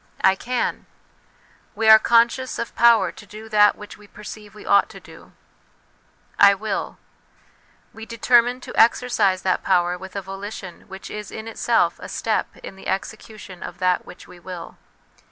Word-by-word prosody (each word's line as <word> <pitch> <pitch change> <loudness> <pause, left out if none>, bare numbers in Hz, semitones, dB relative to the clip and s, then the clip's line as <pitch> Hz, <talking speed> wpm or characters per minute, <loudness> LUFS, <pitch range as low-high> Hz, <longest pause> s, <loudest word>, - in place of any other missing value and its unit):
' - - -15
I 190 - +5
can 245 +5 -3 0.4
' - - -34
we 220 +1 -1
are 220 0 +9
conscious 235 +3 +2
of 235 - -5
power 230 -6 +4
to 205 - -14
do 215 +2 -11
that 210 -1 +5
which 210 0 -12
we 210 - -16
perceive 210 0 -11
we 210 - -12
ought 200 - +3
to - - -12
do. - - -16 0.4
* - - -38
/ - - -35
wiir 200 +1 +3 1.0
we 225 0 -10
determine 240 +1 +2
to - - -9
exercise 225 -5 +2
that 185 -1 0
power 175 0 +1
with 190 +1 -11
a 200 - -3
volition 195 -1 -8
which 190 0 -10
is 210 0 -7
in 220 0 -8
itself 225 - 0
a - - -8
step - - -2
in - - -9
the 190 - -11
execution 210 -1 -6
of 175 - -8
that 180 0 +1
which - - -14
we 180 - -14
will. 175 -1 -9
210 Hz, 175 wpm, -22 LUFS, 190-225 Hz, 1.0 s, are